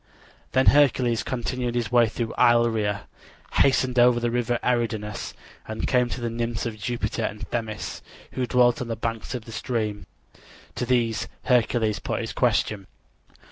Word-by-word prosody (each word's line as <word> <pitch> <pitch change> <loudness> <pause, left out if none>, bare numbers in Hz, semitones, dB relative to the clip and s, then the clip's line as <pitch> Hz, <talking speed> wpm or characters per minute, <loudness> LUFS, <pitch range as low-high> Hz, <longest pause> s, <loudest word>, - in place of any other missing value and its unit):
Then 130 0 +3
Hercules 125 -5 +4
continued 125 -1 -3
his 120 -2 -1
way 120 -2 +5
through 115 0 -3
Illyria, 115 -4 +3 0.5
hastened 130 -2 +3
over 120 0 +5
the 120 0 -1
river 120 0 0
Eridanus, 110 -4 -1 0.3
and 110 0 -3
came 125 -1 +2
to 125 - -4
the 120 - -1
nymphs 115 0 -2
of 115 -2 -3
Jupiter 110 -1 -2
and 105 - -3
Themis, 110 -3 -4 0.3
who 125 -1 -2
dwelt 120 -1 +3
on 125 - -3
the 115 - -2
banks 115 +3 -4
of 120 -3 -6
the 115 - -10
stream. 110 -4 -3 0.7
To 125 - -3
these 115 -3 +1 0.2
Hercules 120 -3 +2
put - - -3
his - - -5
question. 100 -3 0
120 Hz, 155 wpm, -25 LUFS, 110-125 Hz, 0.7 s, way